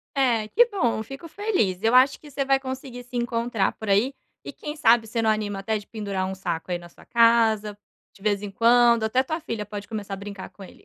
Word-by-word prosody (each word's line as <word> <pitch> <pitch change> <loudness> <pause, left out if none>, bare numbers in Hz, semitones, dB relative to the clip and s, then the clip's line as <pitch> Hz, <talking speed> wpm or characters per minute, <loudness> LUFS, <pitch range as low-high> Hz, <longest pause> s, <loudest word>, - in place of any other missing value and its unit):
É, 240 -5 +2
que 480 - +5
bom, 340 - -1
fico 270 +8 -9
feliz, 315 - -1
eu 225 +2 +2
acho 260 +2 +5
que 295 - -13
você 275 0 -2
vai 270 0 +2
conseguir 260 -1 -6
se 245 0 -9
encontrar 235 -3 0
por 220 - -8
aí, 210 +8 +3 0.3
e - - -7
quem 300 +1 -7
sabe 235 -6 +4
você 230 +1 -2
não 220 - +3
anima 205 -2 -1
até 215 +2 -1
de 205 - -13
pendurar 200 -4 -3
um 190 - -4
saco 180 -2 -4
aí 175 - 0
na 175 0 -13
sua - - -19
casa, 225 -3 +3 0.4
de - - -20
vez 205 -1 0
em 205 - -5
quando, 235 +1 +4
até 255 +4 +2
tua 315 +5 -4
filha 230 -9 -4
pode 205 -1 -8
começar 210 -3 -6
a - - -2
brincar 200 -1 -8
com 200 - -15
ele. 185 - -14
225 Hz, 240 wpm, -24 LUFS, 205-255 Hz, 0.4 s, que